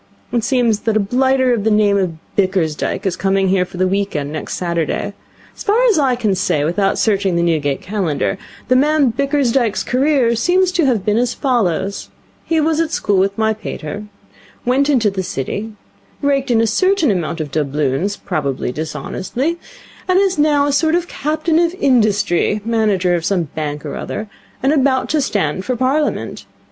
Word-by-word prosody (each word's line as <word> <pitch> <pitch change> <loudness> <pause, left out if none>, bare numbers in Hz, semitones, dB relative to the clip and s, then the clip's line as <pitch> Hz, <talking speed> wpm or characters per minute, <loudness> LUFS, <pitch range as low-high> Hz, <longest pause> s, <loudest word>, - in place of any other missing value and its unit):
It 235 -2 0
seems 235 -3 +2
that 220 -1 0
a - - +3
blighter 260 +4 +2
of 220 -4 -1
the 220 - +2
name 210 -1 +3
of 185 -4 0 0.2
Bickersdyke 185 -6 0
is 185 -2 0
coming 195 0 +1
here 185 -1 +2
for 180 - -11
the 185 +1 +2
week 200 0 -1
end 145 -1 -2
next 155 -1 -5
Saturday. 170 +3 -2 0.4
As - - -12
far 415 +2 +2
as 360 - +2
I 265 -3 +2
can 220 -5 0
say 180 -6 0
without 185 +5 +1
searching 195 -4 +1
the 170 - +1
Newgate 150 -5 0
Calendar, 190 -2 -1 0.3
the 255 - +3
man 290 -1 +3
Bickersdyke's 270 -5 +1
career 260 -2 +2
seems 360 +9 +2
to 345 -5 +1
have 230 -7 0
been 210 0 +2
as 245 0 0
follows. 200 - -1 0.3
He 325 -1 0
was 315 +1 +1
at 330 -1 +1
school 205 -10 0
with 195 +2 0
my 220 0 +2
pater, 210 -2 -6 0.6
went 270 +4 +2
into 230 -8 +3
the 190 -1 -3
City, 185 +7 -4 0.5
raked 275 -1 +1
in 230 -2 +3
a - - +3
certain 335 - +2
amount 170 -3 -2
of 150 -3 -4
doubloons 150 +6 -1
probably 140 -8 -2
dishonestly 185 - -3 0.5
and 370 0 +3
is 385 -3 +2
now 295 -1 +3
a 290 - +1
sort 315 +3 +2
of 350 0 -1
Captain 310 +2 0
of 340 +1 +1
Industry, 215 - +2
manager 210 -6 +1
of 170 -2 0
some 185 -1 +1
bank 150 -1 -4
or - - -5
other, 215 - -5 0.4
and 275 +3 +3
about 265 -3 +1
to 310 - +1
stand 190 - -1
for 255 - -2
Parliament. 270 +5 -1
215 Hz, 180 wpm, -18 LUFS, 185-275 Hz, 0.6 s, a